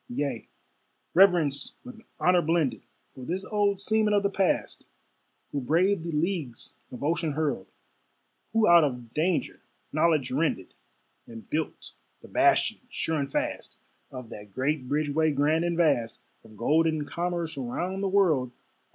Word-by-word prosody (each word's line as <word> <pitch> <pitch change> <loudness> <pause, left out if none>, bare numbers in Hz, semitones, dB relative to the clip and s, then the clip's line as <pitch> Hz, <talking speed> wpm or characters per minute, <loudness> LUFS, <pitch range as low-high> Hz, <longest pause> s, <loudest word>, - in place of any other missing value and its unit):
Yea, 130 -2 -3 0.7
reverence 175 -7 +3
with 245 -3 -11 0.2
honor 180 -1 +4
blended, 165 -4 0 0.3
For 130 - -10
this 185 +8 -3
old 205 -2 0
seaman 215 -1 +2
of 205 - +2
the 200 - +1
past, 195 -1 0 0.7
Who 140 - -2
braved 170 +7 +2
the 170 - -3
leagues 155 - -3
of 125 - -8
ocean 165 0 0
hurled, 145 -10 -2 0.8
Who 225 -1 +3
out 170 -1 +7
of 125 -5 -3
danger 170 +3 -1 0.3
knowledge 155 -4 +2
rended, 135 - -1 0.5
And 115 -1 -11
built 160 +1 -3 0.3
the - - -11
bastions, 325 -9 +2
sure 160 -8 -2
and 140 -1 -3
fast, - - -3 0.3
Of 125 -3 -9
that 105 -2 -11
great 135 0 -1
bridgeway 150 +1 +1
grand 155 +4 +2
and 170 -1 -1
vast 140 -9 +1 0.2
Of 110 -1 -16
golden 155 +5 +2
commerce 170 0 -3
round 175 +9 -3
the 200 - 0
world. 160 -11 +2
160 Hz, 140 wpm, -27 LUFS, 140-180 Hz, 0.8 s, out